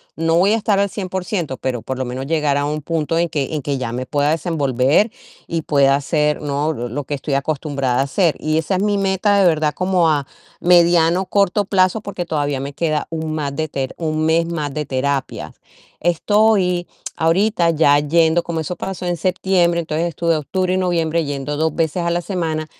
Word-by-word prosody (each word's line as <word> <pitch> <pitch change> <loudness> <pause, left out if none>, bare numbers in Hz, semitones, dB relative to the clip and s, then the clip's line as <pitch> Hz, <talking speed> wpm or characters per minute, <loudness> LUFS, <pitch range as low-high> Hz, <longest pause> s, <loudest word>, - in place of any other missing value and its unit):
no 165 0 0
voy 190 +5 +4
a 225 - +3
estar 205 -2 +1
al 200 0 +1
100%, 185 -7 -3
pero 125 -4 -3
por 130 +2 -4
lo - - 0
menos, 130 +1 -5
llegará 145 -2 +1
un 150 +1 -2
punto 165 +1 -1
en 170 -1 +1
que 145 -1 -2
en 150 - -2
que 140 +1 -2
ya 125 -3 -3
me 125 +1 -4
pueda 145 0 +1
desenvolver 150 - +1 0.3
y 165 -1 -2
pueda 140 -3 +3
hacer, 150 +1 0
¿no?, 145 +1 -1
l 120 -4 -5
lo 145 +5 -4
que 145 - -5
estoy 140 0 -2
acostumbrada 140 -3 -1
a - - +4
hacer. 160 +4 +1
Y 155 0 0
esa 160 +4 0
es - - -1
mi 205 0 +1
meta, 195 +1 +2
de 195 - +4
verdad, 155 -2 +1
como 185 -2 +2
a 145 -3 +1 0.3
mediano, 175 +1 +4
corto 200 0 +1
plazo, 190 +1 +2
porque 185 -4 -5
todavía 145 -4 -1
me 140 +1 -5
queda 155 0 -1
un 160 -1 -3
ma 145 -2 -2
de 155 +3 -3
ter 135 -2 -4
1 155 -1 -1
mes 165 +1 +2
más 150 -4 -3
de 150 -1 -3
terapia. 135 0 -2 0.5
Estoy 180 +1 +2 0.3
ahorita 170 +2 +2
ya 150 -3 +4
yendo, 160 +3 +2
como 170 -1 -4
eso 160 +3 -4
pasó 190 -1 -5
en 175 -1 -1
septiembre, 180 -1 +1
entonces, 160 +1 -2
estuve 170 0 0
octubre 185 +5 -1
y - - +1
noviembre 170 -3 0
yendo 145 +1 -4
2 160 0 0
veces 165 +1 0
a 170 - 0
la 170 +1 0
semana, 165 -4 -2
160 Hz, 205 wpm, -19 LUFS, 145-180 Hz, 0.5 s, voy